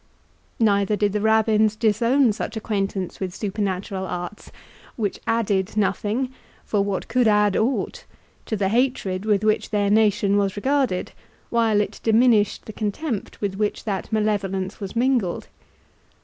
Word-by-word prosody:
Neither 205 Hz, -2 st, +3 dB
did 205 Hz, -1 st, 0 dB
the 210 Hz, -, 0 dB
Rabbins 220 Hz, 0 st, +3 dB
disown 230 Hz, +3 st, +3 dB
such 225 Hz, -, -5 dB
acquaintance 195 Hz, -4 st, -3 dB
with 185 Hz, -2 st, -4 dB
supernatural 195 Hz, -2 st, -3 dB
arts, 180 Hz, +4 st, -6 dB, 0.4 s
which 210 Hz, -4 st, -2 dB
added 210 Hz, -3 st, 0 dB
nothing 215 Hz, +5 st, 0 dB, 0.3 s
(for 205 Hz, -, +1 dB
what 200 Hz, -1 st, -2 dB
could 250 Hz, -2 st, +2 dB
add 210 Hz, -2 st, +3 dB
aught?) 250 Hz, +4 st, -1 dB, 0.4 s
to 220 Hz, -, -1 dB
the 195 Hz, -1 st, +1 dB
hatred 215 Hz, -5 st, 0 dB
with 210 Hz, -1 st, +2 dB
which 215 Hz, 0 st, +1 dB
their 205 Hz, -1 st, +1 dB
nation 210 Hz, -2 st, +3 dB
was 200 Hz, -1 st, 0 dB
regarded, 260 Hz, -3 st, 0 dB, 0.4 s
while 225 Hz, -3 st, +3 dB
it -, -, -4 dB
diminished 225 Hz, -2 st, +3 dB
the 215 Hz, -, -8 dB
contempt 220 Hz, +3 st, -4 dB
with 195 Hz, -2 st, -2 dB
which 210 Hz, 0 st, -1 dB
that 200 Hz, -1 st, -3 dB
malevolence 200 Hz, -3 st, -1 dB
was 195 Hz, 0 st, -6 dB
mingled. 240 Hz, -7 st, 0 dB
210 Hz, 140 wpm, -23 LUFS, 195-225 Hz, 0.4 s, Neither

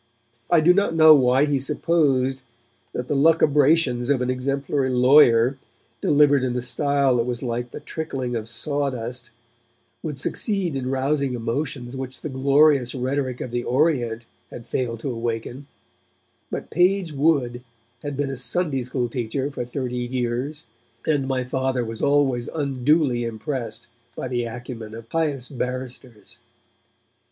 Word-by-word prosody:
I 170 Hz, -2 st, +5 dB
do 175 Hz, +3 st, +6 dB
not 200 Hz, -3 st, +1 dB
know 160 Hz, -1 st, +9 dB
why 130 Hz, 0 st, +4 dB
he 145 Hz, -2 st, 0 dB
supposed 135 Hz, -3 st, +1 dB, 0.5 s
that 125 Hz, -, -4 dB
the -, -, -1 dB
lucubrations 145 Hz, -3 st, +3 dB
of 140 Hz, -3 st, +3 dB
an 125 Hz, -, 0 dB
exemplary 135 Hz, +1 st, -1 dB
lawyer, 125 Hz, -1 st, +5 dB, 0.4 s
delivered 145 Hz, -2 st, +4 dB
in 125 Hz, -1 st, -1 dB
a 125 Hz, -, -1 dB
style 140 Hz, 0 st, +2 dB
that 115 Hz, -, +1 dB
was 120 Hz, 0 st, -3 dB
like 120 Hz, 0 st, -3 dB
the -, -, -8 dB
trickling 135 Hz, -5 st, -4 dB
of 110 Hz, -1 st, -4 dB
sawdust, 125 Hz, -3 st, -3 dB, 0.7 s
would 150 Hz, -4 st, -5 dB
succeed 190 Hz, -, -1 dB
in 130 Hz, -1 st, -3 dB
rousing 135 Hz, 0 st, 0 dB
emotions 125 Hz, +1 st, -3 dB
which 130 Hz, -1 st, -6 dB
the -, -, -4 dB
glorious 140 Hz, -1 st, +3 dB
rhetoric 130 Hz, 0 st, -2 dB
of 125 Hz, -, -5 dB
the 120 Hz, 0 st, -2 dB
Orient 125 Hz, -5 st, 0 dB, 0.2 s
had 120 Hz, -, -10 dB
failed 115 Hz, -3 st, -2 dB
to 135 Hz, -, -3 dB
awaken; 120 Hz, +3 st, -4 dB, 0.8 s
but -, -, -6 dB
Page 180 Hz, -1 st, +2 dB
Wood 135 Hz, -5 st, +1 dB, 0.4 s
had 145 Hz, -2 st, -5 dB
been 140 Hz, -1 st, -1 dB
a -, -, -4 dB
Sunday 135 Hz, +2 st, 0 dB
School 125 Hz, 0 st, -2 dB
teacher 125 Hz, +3 st, -3 dB
for 125 Hz, -3 st, -4 dB
thirty 125 Hz, 0 st, -4 dB
years, 125 Hz, +4 st, -3 dB, 0.4 s
and 145 Hz, -4 st, +1 dB
my 130 Hz, -1 st, 0 dB
Father 130 Hz, -1 st, -1 dB
was 115 Hz, 0 st, -6 dB
always 140 Hz, -4 st, +2 dB
unduly 140 Hz, -2 st, +1 dB
impressed 120 Hz, +2 st, -4 dB, 0.3 s
by -, -, -4 dB
the 120 Hz, -1 st, -1 dB
acumen 115 Hz, -2 st, -7 dB
of 115 Hz, 0 st, -11 dB
pious 145 Hz, -6 st, -1 dB
barristers. 125 Hz, -3 st, -6 dB
130 Hz, 145 wpm, -23 LUFS, 120-145 Hz, 0.8 s, know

